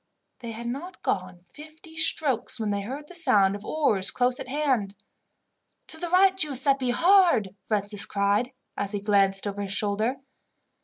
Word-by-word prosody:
They 235 -2 -8
had 235 +2 -8
not 280 +10 -7
gone 185 -1 -3
fifty 310 - -15
strokes 295 -7 +1
when 215 -2 -2
they 200 0 -2
heard 270 +8 -7
the 360 - -12
sound 200 - +4
of 205 - -9
oars 215 -12 +1
close 250 0 0
at - - -7
hand. 255 -9 -1 0.9
"To 320 - -7
the 345 0 -3
right, 380 +2 +4
Giuseppi, 275 -5 +1
hard!" 335 - +3
Francis 205 -1 0
cried 200 +4 0 0.2
as 200 0 -4
he 205 - -2
glanced 195 -1 +1
over 205 0 -4
his 195 -1 -3
shoulder. 215 +6 -1
235 Hz, 160 wpm, -25 LUFS, 200-300 Hz, 0.9 s, sound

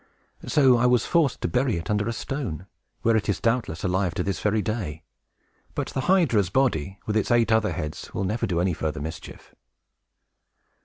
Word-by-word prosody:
So 130 -4 +5
I 120 +1 +3
was 125 -3 +3
forced 160 -7 +1
to - - 0
bury 125 -5 +1
it 85 - -5
under 105 0 0
a - - 0
stone, 115 - -4 0.4
where 115 0 +3
it 110 -1 0
is 100 - 0
doubtless 115 -8 -1
alive 90 -1 0
to 90 - -1
this 100 0 -2
very 105 0 +1
day. 100 -9 -4 0.7
But - - -2
the 130 - -2
hydra's 125 - +3
body, 95 - 0
and 105 - -2
its 110 - +1
eight 120 -2 +3
other 110 -4 +2
heads, 75 -1 -5
will 100 - -3
never 105 +5 -1
do 85 -2 0
any 90 0 +1
further 80 -2 -3
mischief." 80 +3 -8
105 Hz, 190 wpm, -25 LUFS, 90-120 Hz, 0.7 s, So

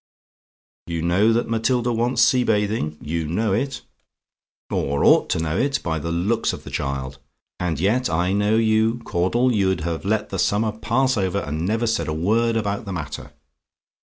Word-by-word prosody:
"You 85 -1 -3
know 95 +6 +3
that 115 +1 +1
Matilda 120 +2 0
wants 120 +1 +2
sea 125 0 +4
bathing; 105 -9 0
you 80 +1 -2
know 100 +5 0
it, 135 +6 -2 0.9
or 70 +1 0
ought - - +5
to - - 0
know 80 -1 -1
it, 140 +1 +1
by 80 -2 -1
the 85 +3 -4
looks 100 +7 0
of - - -8
the - - -9
child; 65 -1 -4 0.4
and 85 -5 -2
yet 115 +8 +1
I 90 +3 0
know 105 +2 +2
you, 110 +1 +2
Caudle 120 +8 +1
you'd 95 -4 +1
have 85 0 -3
let 105 +2 -1
the 95 - -4
summer 105 +4 +1
pass 130 +4 0
over, 95 -1 0
and 80 +4 -3
never 110 +3 0
said 115 0 0
a 75 - -1
word 115 +8 +1
about 105 +1 -2
the 100 - -5
matter. 75 -4 -6
100 Hz, 180 wpm, -22 LUFS, 85-115 Hz, 0.9 s, ought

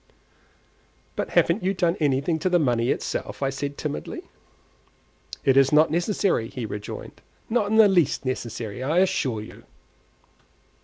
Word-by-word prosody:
"But - - -3
haven't 170 +6 +3
you 190 +2 0
done 175 -2 +1
anything 145 +2 +1
to 185 - 0
the 180 - +4
money 120 -6 +1
itself?" - - -3
said 140 +1 -3
I, - - -26
timidly. 75 - -5 1.2
"It 135 - +4
is 135 -1 +5
not 155 0 +5
necessary," 175 - 0
he 125 -3 -5
rejoined; 105 -1 -7 0.3
"not 220 -3 +1
in 220 - +1
the 220 -1 +8
least 175 -8 +2
necessary, 120 -3 -4
I 150 +6 0
assure 135 - +1
you." 110 - -12
145 Hz, 145 wpm, -24 LUFS, 125-180 Hz, 1.2 s, the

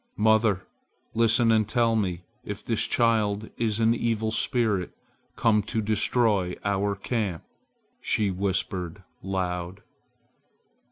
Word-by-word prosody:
"Mother, 110 -3 +3 0.5
listen 115 +1 +4
and 110 -2 +2
tell 115 0 +2
me 90 -5 -1 0.2
if 105 0 -7
this 115 -2 +1
child 110 -3 +1
is 110 -2 -1
an 115 0 +4
evil 115 -2 -1
spirit 110 -6 0 0.4
come 110 -2 +3
to 115 - -1
destroy 105 -3 +1
our 100 0 0
camp!" 100 -4 -3 0.6
she 105 -3 +1
whispered 95 -1 -2 0.2
loud. 90 -1 -3
105 Hz, 110 wpm, -26 LUFS, 95-115 Hz, 0.6 s, listen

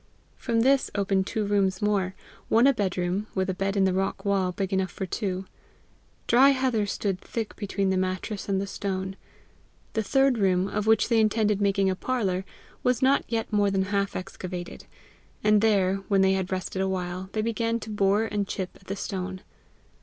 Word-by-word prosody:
From 230 -2 0
this 270 +2 +3
opened 195 -1 +1
two 215 -1 -1
rooms 195 -2 +1
more 200 -3 0 0.3
one 230 +3 +5
a 275 - +6
bedroom, 190 -1 -1
with 190 0 0
a - - -3
bed 195 +2 -2
in 195 - +4
the 190 -1 +2
rock 195 +1 -2
wall, 195 -2 +1
big 195 +1 -3
enough 190 -1 +1
for 190 - -5
two. 190 -1 -3 0.8
Dry 260 +4 +6
heather 255 -6 +1
stood 195 -2 -2
thick 225 -2 -5
between 200 -2 -1
the 190 - +1
mattress 185 +3 -3
and 195 -1 +1
the 195 - -2
stone. 190 -1 -4 0.8
The 220 - +1
third 270 +2 +2
room, 185 -1 +2
of 210 +1 -2
which 220 -1 +4
they 230 -2 +3
intended 215 -1 +2
making 200 -1 +2
a - - -2
parlour, 190 -5 -1 0.4
was 250 0 +1
not 270 +2 +4
yet 225 -1 -2
more 205 -1 +3
than 195 -1 +1
half 200 0 0
excavated; 185 -1 -6 0.6
and 210 -1 +4
there, 195 -3 +3
when 195 -2 +3
they 190 0 +4
had 190 -1 -2
rested 185 0 -2
a 190 - 0
while, 185 0 -3
they 215 - 0
began 230 +1 0
to 215 - -7
bore 205 +1 +2
and 205 -2 -2
chip 190 -2 -4
at 190 - -23
the 195 - -3
stone. 185 -1 -4
195 Hz, 190 wpm, -26 LUFS, 190-215 Hz, 0.8 s, a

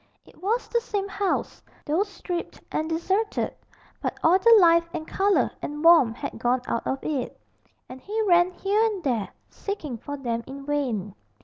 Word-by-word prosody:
It - - -20
was 445 +6 0
the 470 - 0
same 410 -5 -3
house, 400 -1 -2 0.2
though 310 +6 +1
stripped 380 -4 -5
and 315 +1 -1
deserted, 380 +6 -1 0.5
but - - -3
all 350 +4 +5
the 460 +3 +7
life 335 -2 +5
and 315 -1 -5
colour 400 +1 +2
and 295 +1 -5
warmth 290 -9 +6
had - - -6
gone 245 +2 +1
out 230 - -2
of 265 - -2
it; 280 -5 -3 0.5
and 255 +1 -10
he 425 +7 -4
ran 350 -3 +5
here 395 +4 0
and 420 -5 -1
there, 235 -7 0 0.2
seeking 305 - -5
for 285 +4 -6
them 235 -4 -3
in 275 +1 -8
vain. 245 -10 -2
335 Hz, 175 wpm, -25 LUFS, 270-395 Hz, 0.5 s, the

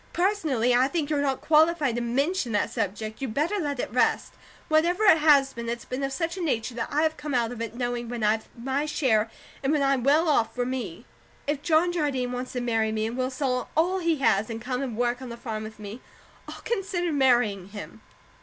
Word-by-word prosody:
"Personally, 315 - +1
I 250 +2 +4
think 310 0 -2
you're 290 -1 +1
not 270 -2 -1
qualified 310 -3 +3
to 240 - -2
MENTION 270 - 0
that 205 - 0
subject; 215 +4 -3
you 270 - -1
better 310 - -1
let 290 -6 -2
it 230 - -3
rest. 250 - +1 0.3
Whatever 340 +6 +2
it 320 - +7
has 280 -3 +5
been, 235 0 -5
it's 235 0 -4
been 255 +2 -4
of 275 - -1
such 330 +4 -2
a 375 - -5
nature 250 -7 -1
that 230 0 -3
I 300 +2 +2
have 315 0 0
come 295 -3 -4
out 235 -1 +1
of 240 -2 -7
it 230 0 -5
knowing 240 -1 -3
when 240 -2 -4
I 210 - +4
have 220 0 -2
my 270 +5 -1
share 225 -7 +1 0.3
and 270 +1 0
when 300 -2 +2
I'm 275 -3 +2
well 300 +5 +4
off, 280 -7 +2
for 245 0 -1
me. 245 -10 -5 0.4
If 290 -1 -1
John 320 +3 +3
Jardine 280 -7 -1
wants 250 +1 -5
to 250 - -2
marry 225 -2 0
me, 220 0 -1
and 225 +2 -3
will 255 0 -1
sell 255 -2 -2
all 360 +4 +2
he 335 -2 +1
has, 225 -6 +2
and 225 -1 -4
come 250 +2 -3
and 245 -5 -4
work 245 +1 0
on 260 - -7
the 235 - -7
farm 220 -3 -5
with 215 0 -8
me, 210 +3 -8 0.5
I'll - - -9
consider 390 -6 -2
marrying 240 -9 +2
him. 205 0 -9
255 Hz, 230 wpm, -26 LUFS, 235-305 Hz, 0.5 s, it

